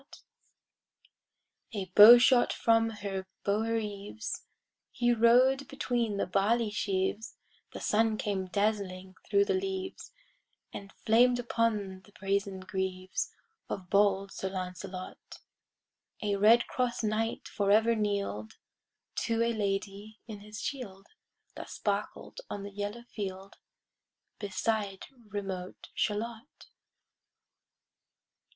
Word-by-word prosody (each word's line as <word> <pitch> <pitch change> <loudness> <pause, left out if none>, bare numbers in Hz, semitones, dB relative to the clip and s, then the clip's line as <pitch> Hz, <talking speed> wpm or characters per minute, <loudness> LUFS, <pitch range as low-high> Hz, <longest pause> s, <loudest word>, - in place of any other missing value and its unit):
PART - - -17 1.5
III 200 - -1
A - - -7
bow 220 +5 +11
shot 245 0 +4
from 225 0 +3
her 200 -3 -5 0.2
bower 220 +3 +1
eaves, 210 0 -5 0.4
He 240 -1 +1
rode 250 +4 +4
between 240 -6 -1
the - - 0
barley 210 +4 +1
sheaves, 200 +1 -2 0.4
The - - -7
sun 220 0 +2
came 195 -3 -2
dazzling 190 -2 -1 0.2
thro' 400 0 +4
the 405 0 0
leaves, 380 0 -4 0.6
And 195 -1 -8
flamed 245 +3 +5
upon 215 -5 -1
the 205 - -21
brazen 195 -1 -2
greaves 185 0 -3 0.4
Of 180 -2 -6
bold 200 -1 +3
Sir 190 - -4
Lancelot.[Pg 185 0 -7 0.8
70] 210 -2 -1
A 200 - -1
red 230 +3 +6
cross 250 -2 -2
knight 220 +1 -1
forever 215 +3 +3
kneel'd 200 - -2 0.7
To 230 0 +1
a 235 0 +1
lady 205 +1 -3
in 215 -3 -8
his 210 +2 -9
shield, 210 -8 -5 0.5
That - - -8
sparkled - - -3
on 200 - -5
the 200 - -7
yellow 205 +4 -4
field, 195 -4 -7 0.8
Beside 205 0 -2 0.2
remote 190 -3 -6
Shalott. 225 +5 -4
210 Hz, 115 wpm, -30 LUFS, 195-230 Hz, 1.5 s, bow